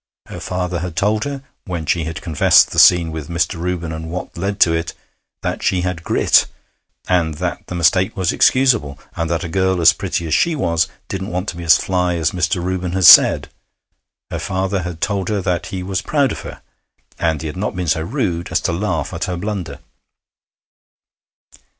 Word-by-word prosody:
Her - - -7
father 90 -1 -3
had 85 -1 -5
told 105 +3 0
her, 140 -1 -5 0.2
when 85 -4 -4
she 80 +2 0
had 80 +1 -6
confessed 80 -6 +4
the - - 0
scene 85 -2 +6
with 80 -3 -7
Mr. 85 0 -1
Reuben 85 -2 -3
and 80 0 -6
what 90 +2 -6
led 100 +3 -3
to 85 - +5
it, 80 0 -2 0.5
that - - -3
she 90 - +1
had 90 -2 -3
grit, - - +3 0.6
and 85 -4 +1
that - - -4
the 90 - -6
mistake 95 +5 +2
was 95 -3 +1
excusable, 115 - +2 0.2
and 85 -1 -2
that 85 0 -1
a - - -4
girl 95 +1 0
as 85 - +6
pretty 85 - -3
as 80 - -2
she 170 - +2
was 85 - 0 0.2
didn't 95 +1 -5
want 90 +3 -3
to - - -6
be 85 - -7
as 80 -1 +6
fly 90 -2 -1
as 80 -2 0
Mr. 90 -1 -1
Reuben 90 -1 -3
had 95 -1 +1
said. - - +8 0.8
Her - - -3
father 95 +1 -2
had 85 -2 -7
told 100 -2 -1
her 105 -1 0
that 90 -3 -2
he 95 -1 -5
was 95 0 -2
proud 145 -3 +1
of - - -5
her, - - -10 0.6
and 80 -3 0
he - - -6
had 75 - -5
not 100 +2 -3
been 90 -1 -3
so 80 - +1
rude 85 - -3
as - - +2
to - - -1
laugh 85 -5 -2
at - - -3
her 90 -1 -4
blunder. 90 -7 -5
90 Hz, 200 wpm, -18 LUFS, 85-95 Hz, 0.8 s, said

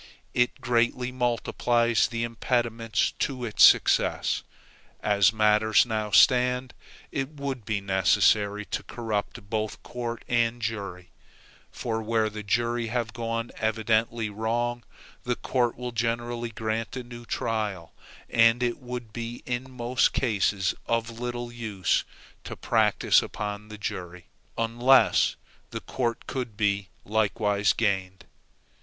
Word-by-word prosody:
It 125 0 +1
greatly 120 +1 +1
multiplies 120 -1 +1
the 115 0 -3
impediments 115 -1 0
to 130 -3 -2
its 110 - +3
success. - - +4 0.6
As 100 -2 +4
matters 110 +1 +4
now 110 -2 -2
stand, 125 +4 +4 0.4
it 135 -1 -2
would 140 -6 -5
be 105 -1 -1
necessary 100 +2 +2
to - - -3
corrupt 110 -1 -4
both 110 -1 -2
court 120 -1 -5
and 120 0 +1
jury; 100 -5 -5 0.6
for 110 -1 -3
where 110 -1 0
the 105 0 -6
jury 115 +3 0
have 115 -1 -2
gone 115 0 -3
evidently 110 +1 0
wrong, 120 +3 -2 0.4
the 125 0 -1
court 120 -2 0
will 125 0 -4
generally 120 +1 -2
grant 110 +1 -3
a 125 - -4
new 120 0 -10
trial, 105 -7 -3 0.3
and 115 +2 +4
it 120 +2 -1
would 125 -4 -7
be 120 0 -6
in 125 +1 -3
most 125 0 +1
cases 100 -4 +1
of 115 0 -1
little 120 0 -4
use 110 -6 0 0.4
to - - -7
practice - - +3
upon 105 0 -5
the 105 0 -9
jury, 90 -3 -6 0.3
unless 120 +3 +4 0.3
the - - -5
court 120 -3 -2
could 120 -6 -5
be 100 -3 0 0.2
likewise 105 -1 +1
gained. 95 -4 -1
115 Hz, 125 wpm, -26 LUFS, 105-120 Hz, 0.6 s, success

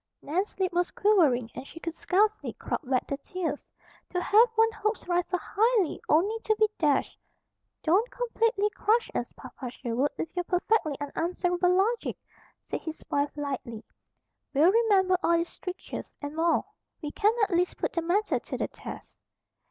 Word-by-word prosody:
Nan's 370 +8 -2
lip 370 -2 0
was 355 0 +1
quivering 295 - +3
and 255 +2 -8
she 330 - -11
could 335 -1 -4
scarcely 415 +6 +1
crowd - - -3
back 255 -2 +2
the 280 - -3
tears. 320 0 -4 0.4
To 360 - -1
have 435 +6 +5
one's 450 0 +4
hopes 430 -2 -2
rise 350 0 +1
so 365 - 0
high 430 -4 +1
only 395 +9 +3
to 435 - +2
be 435 0 +4
dashed. 295 -4 +1 0.6
"Don't 390 +10 +3
completely 455 -3 0
crush 450 +3 +1
us, - - -2
Papa 255 - -8
Sherwood, 245 +3 -1
with 325 - -5
your 355 -1 -1
perfectly 360 -4 +1
unanswerable 355 +4 0
logic," 440 +5 +1 0.5
said - - -4
his 320 -1 -7
wife 285 0 +2
lightly. 265 -6 -4 0.7
"We'll 315 +6 +6
remember 390 -5 +3
all 335 - +3
these 335 +1 -1
strictures, 365 0 -7
and 290 +1 -6
more. 330 +1 +2 0.4
We 295 - -3
can 425 +6 +3
at 405 - +1
least 355 +1 +1
put - - -2
the 335 - 0
matter 365 +6 +1
to - - -6
the - - -2
test." - - -10
360 Hz, 165 wpm, -28 LUFS, 305-420 Hz, 0.7 s, We'll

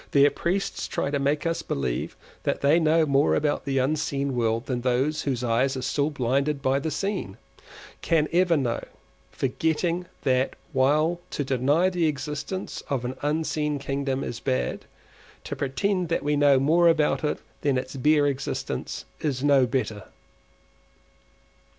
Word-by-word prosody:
Their 140 0 +6
priests 190 +3 -2
try 140 - -2
to 140 - 0
make 145 +4 0
us 165 0 0
believe 65 -3 -3 0.3
that - - -1
they 145 +4 +4
know 160 0 +3
more 140 0 +3
about 145 -1 0
the 135 -1 -1
unseen 140 0 0
world 115 0 0
than 125 -2 -2
those 130 +5 +1
whose 130 -3 -2
eyes 125 +3 +1
are 130 - -4
still 140 +3 0
blinded 140 +1 0
by 135 0 +1
the 160 - -2
seen, 155 - -3 0.6
can 155 -2 +2
ever 175 -1 +4
know—forgetting 160 +6 -2 0.2
that 130 -1 +1 0.2
while 150 +6 +2
to 145 - -2
deny 140 +7 +2
the 175 -3 +1
existence 150 +5 -4
of 130 -3 -1
an 125 +1 -3
unseen 150 0 -1
kingdom 135 -1 -2
is - - -5
bad, 65 -1 -2 0.6
to - - -5
pretend 175 +7 -1
that 170 - 0
we 145 +1 +1
know 145 -2 +5
more 165 +5 +4
about 160 -2 +2
it 150 - 0 0.2
than 140 -3 +1
its 130 +2 -4
bare 150 +2 +3
existence 140 -1 -3
is 140 -4 -2
no 140 -3 +5
better. 115 -5 -2
140 Hz, 150 wpm, -25 LUFS, 130-155 Hz, 0.6 s, Their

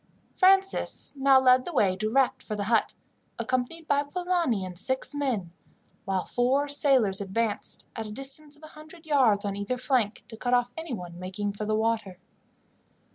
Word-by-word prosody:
Francis 385 0 +2
now 270 -1 +5
led 255 -1 +4
the 350 - -6
way 200 - +2
direct 225 +6 0
for 215 - -5
the 205 - -3
hut, 225 +2 +1 0.4
accompanied 255 +6 -3
by 285 0 +2
Polani 330 - -1
and 180 -1 -6
six 260 +6 +1
men, 250 -12 -2 0.5
while 190 -2 -1
four 265 +4 0
sailors 265 -9 +4
advanced, 205 +2 -1
at 225 -1 -5
a - - -8
distance 275 +5 +1
of 300 - -23
a 310 - -11
hundred 315 +2 -14
yards 245 -9 +2
on 200 -1 -2
either 205 +5 -3
flank, 245 -5 -1
to 225 - -10
cut 245 +2 0
off 245 0 0
anyone 195 - -7
making 195 +3 -4
for 205 +1 -6
the 215 0 0
water. 220 -4 -1
245 Hz, 170 wpm, -26 LUFS, 205-285 Hz, 0.5 s, now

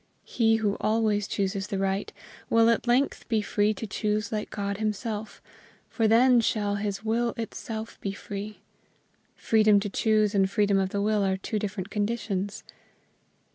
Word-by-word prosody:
He 225 -2 +2
who 210 -2 0
always 215 -2 +1
chooses 195 -1 -2
the 200 - -3
right, 195 +1 -1 0.4
will 230 0 +5
at 230 - -1
length 250 +4 +1
be 220 -3 +1
free 205 +1 +1
to 225 - -5
choose 210 0 -2
like 215 -1 -3
God 200 -1 -3
himself, 215 0 -4 0.5
for 225 -2 +1
then 240 +2 +5
shall 205 -2 0
his 205 +1 -4
will 235 +2 0
itself 225 0 -6
be 195 - -2
free. 205 +1 -7 0.7
Freedom 215 -2 +4
to 205 +1 -3
choose 215 0 +2
and 195 -1 +3
freedom 200 -1 +2
of 190 -1 0
the 200 +1 -2
will 210 -1 +2
are 190 -1 +1
two 210 +3 -3
different 200 -1 -4
conditions. 205 -2 -2
210 Hz, 160 wpm, -27 LUFS, 200-225 Hz, 0.7 s, will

